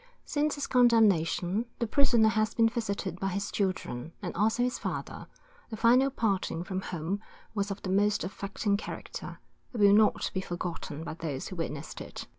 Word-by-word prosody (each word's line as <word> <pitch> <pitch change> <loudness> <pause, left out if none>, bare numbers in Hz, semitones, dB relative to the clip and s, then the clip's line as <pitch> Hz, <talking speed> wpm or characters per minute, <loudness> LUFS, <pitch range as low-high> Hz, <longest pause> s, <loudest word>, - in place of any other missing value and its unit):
Since 300 0 0
his 285 - -3
condemnation, 220 -4 +3
the 235 - 0
prisoner 235 -2 +4
has 215 -1 0
been 230 -1 +5
visited 200 -6 -3
by 195 - -1
his 200 +1 -2
children, 185 -7 -2
and 180 -4 -5
also 220 +5 +2
his 250 0 -1
father, - - -5 0.4
the 220 - -5
final 250 +4 +5
parting 200 -9 -1
from 185 +1 -3
whom 180 +2 -3 0.3
was 205 -1 -1
of 200 0 -5
the 185 - -2
most 205 +2 +2
affecting 200 +1 -1
character, - - -7 0.4
and 235 - -4
will 200 0 +8
not 215 0 +4
be 190 - -1
forgotten 175 -4 -5
by 165 - -5
those 155 -5 -4
who 185 - -7
witnessed 160 -3 -5
it. - - -7
200 Hz, 175 wpm, -29 LUFS, 180-225 Hz, 0.4 s, will